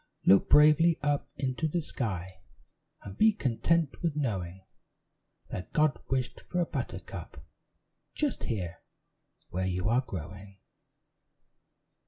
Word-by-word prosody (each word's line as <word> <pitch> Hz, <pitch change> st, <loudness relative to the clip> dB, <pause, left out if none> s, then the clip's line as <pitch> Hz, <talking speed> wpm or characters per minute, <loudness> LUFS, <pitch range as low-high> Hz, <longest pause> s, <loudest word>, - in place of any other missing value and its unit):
"Look 95 Hz, -, +6 dB
bravely 155 Hz, +3 st, +6 dB
up 145 Hz, -1 st, 0 dB
into 135 Hz, +4 st, -1 dB
the 170 Hz, +2 st, -1 dB
sky, 95 Hz, -9 st, -4 dB, 0.6 s
And 100 Hz, -1 st, -8 dB
be 220 Hz, 0 st, +5 dB
content 160 Hz, -, 0 dB
with 165 Hz, -4 st, 0 dB
knowing 95 Hz, -10 st, -3 dB, 0.9 s
That 90 Hz, -, -6 dB
God 150 Hz, -5 st, +3 dB
wished 130 Hz, -2 st, -1 dB
for 180 Hz, -, -3 dB
a 175 Hz, -, +2 dB
buttercup -, -, -6 dB, 0.7 s
Just 295 Hz, -3 st, -1 dB
here, 90 Hz, -7 st, -3 dB, 0.7 s
where 95 Hz, +1 st, -1 dB
you 90 Hz, +2 st, -1 dB
are 120 Hz, +3 st, +3 dB
growing." 95 Hz, -, -8 dB
125 Hz, 115 wpm, -29 LUFS, 95-155 Hz, 0.9 s, Look